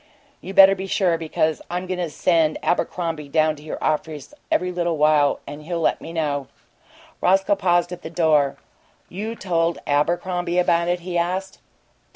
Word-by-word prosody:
You 195 - -8
better 195 0 +9
be 190 0 -5
sure, 185 -3 +1
because 155 -1 -1
I'm 180 +1 -3
going 185 0 -4
to 175 -2 -2
send 160 0 +1
Abercrombie 165 -2 -2
down 155 +1 +2
to - - -13
your 155 - -6
office 155 - -2 0.2
every 180 0 +1
little 175 -2 -1
while, 150 -1 +3
and 145 +1 -8
he'll 170 +2 -4
let 165 - 0
me 165 - -8
know." 145 -4 -2 0.7
Roscoe 195 +2 +3
paused 175 -2 +1
at 180 - -7
the - - -7
door. 155 -4 +2 0.5
"You 215 +5 -5
told 170 -4 0
Abercrombie 175 +4 0
about 170 -1 +2
it?" 175 0 0
he 175 0 -2
asked. 185 +2 -3
170 Hz, 170 wpm, -22 LUFS, 155-180 Hz, 0.7 s, better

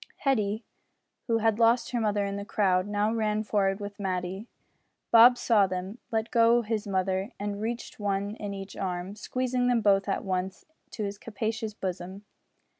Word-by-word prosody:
Hetty, 220 -5 0 0.6
who 230 -2 +2
had 225 0 +1
lost 235 +1 +3
her 240 -2 0
mother 205 -2 +1
in 200 0 -3
the 200 - -4
crowd, 190 -2 +1
now 205 +1 0
ran 215 -1 0
forward 195 -2 +1
with 205 0 -7
Matty. 190 +2 -3 0.6
Bob 240 +2 +8
saw 210 -6 +3
them, 185 +4 -5
let 225 -1 -1
go 235 0 +4
his 215 -1 -2
mother, 190 +1 0
and 205 0 -3
received 235 +1 -4
one 200 0 -1
in 205 -1 -5
each 195 0 -7
arm 185 +1 -4
squeezing 250 +3 -1
them 245 -2 +3
both 200 -1 +3
at - - -1
once 185 0 -3 0.2
to 215 - -5
his 200 0 -4
capacious 220 -1 -4
bosom. 185 +1 -5
205 Hz, 170 wpm, -28 LUFS, 195-225 Hz, 0.6 s, Bob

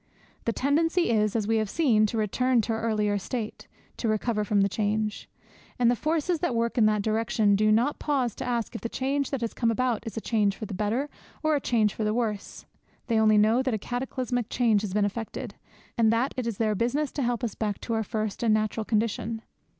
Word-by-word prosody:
The 230 - +2
tendency 325 +6 +1
is, 215 -1 +2
as 215 -3 0
we 225 0 +2
have 215 -2 0
seen, 225 -9 +3
to 225 - -3
return 240 +3 +2
to 225 - -2
our 220 - -2
earlier 210 -2 +1
state, 220 +2 -5 0.3
to 230 - -2
recover 215 0 0
from 205 -1 +2
the 195 - +4
change. 210 +1 -2 0.5
And 240 -1 +4
the - - +2
forces 320 +5 0
that 345 -8 -1
work 230 0 0
in 215 - +6
that 210 -1 +1
direction 220 -1 +2
do 215 +1 +3
not 240 +7 +2
pause 265 -6 0
to - - -4
ask 240 -1 -2
if 230 - -6
the 230 - -3
change 275 +2 -1
that 270 -3 -3
has 230 - -2
come 230 - +1
about 240 -1 0
is 225 - -6
a - - +1
change 210 -3 +1
for 215 - -6
the 200 - -7
better 215 +8 -1 0.4
or 310 0 +3
a 285 - 0
change 220 -5 +2
for 220 - -3
the 215 +1 0
worse. 215 -4 -3 0.4
They 230 -3 +1
only 215 -1 +5
know 220 +4 +4
that 260 -3 0
a - - 0
cataclysmic 245 0 -3
change 225 -5 +2
has 205 -3 -4
been 210 -1 +3
effected, 220 +2 -5 0.5
and 220 -1 +5
that 235 +4 +1
it 255 -2 -2
is 225 -4 -3
their 215 -2 +1
business 250 +7 0
to 285 - -3
help 245 -1 -1
us 230 - -1
back 210 -2 -2
to 230 - -3
our 225 - +1
first 215 -1 -3
and 230 -2 +3
natural 215 0 -1
condition. 225 +1 -1
225 Hz, 230 wpm, -27 LUFS, 215-245 Hz, 0.5 s, in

